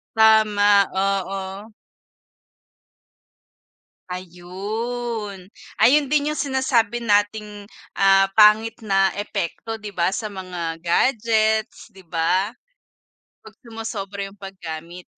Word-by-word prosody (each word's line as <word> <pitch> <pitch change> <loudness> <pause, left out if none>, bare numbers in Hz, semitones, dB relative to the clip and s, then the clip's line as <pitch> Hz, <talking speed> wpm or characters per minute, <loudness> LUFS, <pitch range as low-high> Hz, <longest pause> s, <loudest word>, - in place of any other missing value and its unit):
Tama, 210 -2 +5
oo. 195 +2 -2 2.4
Ayun, 200 +3 -5 0.3
ayun 285 +4 +5
din 295 +1 +1
yung 305 - -3
sinasabi 260 -4 0
nating, 205 -1 0 0.3
ah, 195 0 +5
pangit 215 +1 +5
na 195 -1 +3
epekto, 210 +2 -4
'di 210 - -6
ba, 180 -1 0
sa 215 0 -3
mga 180 -4 -5
gadgets, 220 +4 +1
'di 190 -4 -17
ba? 180 +6 0 0.9
Pag 220 - -13
sumosobra 215 -4 -6
yung 195 - -10
paggamit. 175 -2 -8
205 Hz, 90 wpm, -22 LUFS, 190-225 Hz, 2.4 s, Tama